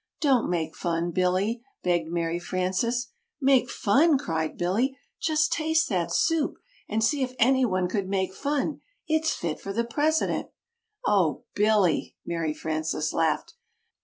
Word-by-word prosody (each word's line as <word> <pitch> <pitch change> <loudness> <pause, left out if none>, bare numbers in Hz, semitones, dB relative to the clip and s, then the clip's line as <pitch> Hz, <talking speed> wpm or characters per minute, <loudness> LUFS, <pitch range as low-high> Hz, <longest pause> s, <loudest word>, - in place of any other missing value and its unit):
"Don't 270 -6 +3
make 165 -3 -2
fun, 170 0 -1
Billy," 185 +6 +1 0.2
begged 175 -2 +1
Mary 170 0 -1
Frances. 185 +8 -1 0.3
"'Make 265 -3 +3
fun,'" 280 +9 +3
cried 160 - -2
Billy. 230 +10 0 0.2
"Just 310 0 +2
taste 320 +1 +1
that 180 -5 0
soup 325 -2 +1 0.3
and 220 +1 0
see 285 +4 +2
if 255 -1 -2
anyone 235 -7 +3
could 190 0 -2
make 190 -1 -1
fun. 285 +4 -2 0.3
It's 315 0 +2
fit 160 -3 -3
for 195 - -6
the 235 +3 0
President." 305 +6 0 0.6
"Oh 185 -7 +2
Billy!" 205 -6 +2
Mary 165 -3 -2
Frances 155 -1 -2
laughed. 165 -1 0
205 Hz, 135 wpm, -26 LUFS, 175-270 Hz, 0.6 s, Don't